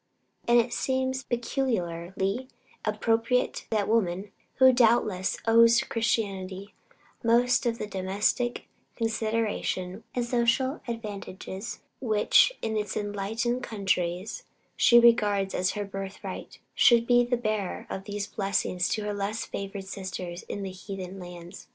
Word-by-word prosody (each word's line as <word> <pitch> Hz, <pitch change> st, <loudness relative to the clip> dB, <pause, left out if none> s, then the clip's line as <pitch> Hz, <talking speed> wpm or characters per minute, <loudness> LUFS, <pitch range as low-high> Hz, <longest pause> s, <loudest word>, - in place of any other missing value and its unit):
And 240 Hz, 0 st, +6 dB
it 240 Hz, +1 st, 0 dB
seems 260 Hz, 0 st, 0 dB
peculiarly 220 Hz, -4 st, -2 dB, 0.4 s
appropriate 225 Hz, +3 st, 0 dB
that 210 Hz, -3 st, 0 dB
woman, 200 Hz, -3 st, 0 dB, 0.2 s
who 260 Hz, 0 st, +7 dB
doubtless 220 Hz, -6 st, +3 dB
owes 230 Hz, +1 st, +6 dB
to -, -, 0 dB
Christianity 200 Hz, -4 st, -2 dB, 0.5 s
most 240 Hz, +2 st, +3 dB
of 230 Hz, -1 st, 0 dB
the -, -, -3 dB
domestic 205 Hz, +5 st, -1 dB, 0.3 s
consideration 220 Hz, -4 st, -1 dB
and 245 Hz, -1 st, 0 dB
social 245 Hz, +4 st, +1 dB
advantages, 205 Hz, -2 st, -6 dB, 0.2 s
which 220 Hz, -, +4 dB
in 220 Hz, -1 st, -1 dB, 0.2 s
enlightened 215 Hz, +4 st, -2 dB
countries 190 Hz, -, -2 dB, 0.3 s
she 240 Hz, -, +7 dB
regards 205 Hz, -5 st, +4 dB
as 185 Hz, 0 st, +1 dB
her 205 Hz, -1 st, -3 dB
birthright, 195 Hz, -1 st, -7 dB, 0.2 s
should 235 Hz, -1 st, +5 dB
be 245 Hz, 0 st, +5 dB
the 245 Hz, 0 st, 0 dB
bearer 215 Hz, -5 st, -2 dB
of 190 Hz, -, -6 dB
these 205 Hz, -1 st, -3 dB
blessings 195 Hz, -3 st, -1 dB
to 215 Hz, -, -1 dB
her 210 Hz, 0 st, -2 dB
less 205 Hz, +3 st, -2 dB
favored 195 Hz, 0 st, -6 dB
sisters 185 Hz, -2 st, -6 dB
in 200 Hz, -, -4 dB
heathen 190 Hz, 0 st, -7 dB
lands. 175 Hz, +1 st, -10 dB
215 Hz, 120 wpm, -27 LUFS, 195-235 Hz, 0.5 s, who